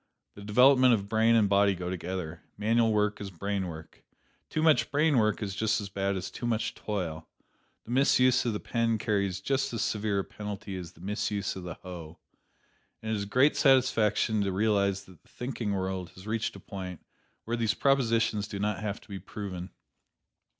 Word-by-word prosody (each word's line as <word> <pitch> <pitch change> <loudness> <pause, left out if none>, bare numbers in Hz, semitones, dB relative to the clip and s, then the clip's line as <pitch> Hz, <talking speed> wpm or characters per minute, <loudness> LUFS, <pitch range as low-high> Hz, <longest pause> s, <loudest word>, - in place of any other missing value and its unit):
The 100 - -12
development 125 +4 +6
of 100 -2 -5
brain 110 +2 +3
and 110 -3 +4
body 100 0 +4
go 90 0 -4
together 90 -2 -5 0.2
manual 115 +2 +2
work 105 -1 +1
is 100 - -5
brain 95 +1 -3
work. 80 -1 -10 0.5
Too 155 - -1
much 160 -2 +4
brain 145 -2 +3
work 110 0 +1
is 100 -2 -3
just 105 +1 +1
as 100 -2 -6
bad 100 0 -1
as 95 -1 -4
too 120 - -4
much 110 -2 0
toil; 85 -7 -4 0.6
the 115 - -9
misuse 130 -1 +4
of 120 - 0
the 105 - -2
pen 115 -1 0
carries 100 -4 -1
just 135 +4 0
as 115 - -1
severe 105 -1 0
a 100 - +1
penalty 105 -1 -6
as 90 -3 -7
the - - -18
misuse 100 0 -2
of 95 - -6
the 85 - -5
hoe. 85 -3 -9 0.9
And 110 - -3
it - - +1
is 100 - -2
a - - -10
great 130 +8 +4
satisfaction 115 -5 +3
to 100 -1 0
realize 100 -1 +1
that 90 -4 -17
the - - -28
thinking 125 -4 -4
world 95 -1 -3
has 95 - -12
reached 110 0 -2
a - - -9
point 95 -3 -8 0.4
where 115 - -1
these 115 -2 0
propositions 115 -6 +2
do 100 - -6
not 105 0 -1
have 105 -1 -3
to - - -19
be 100 -2 -6
proven. 95 -1 -6
105 Hz, 195 wpm, -29 LUFS, 95-115 Hz, 0.9 s, development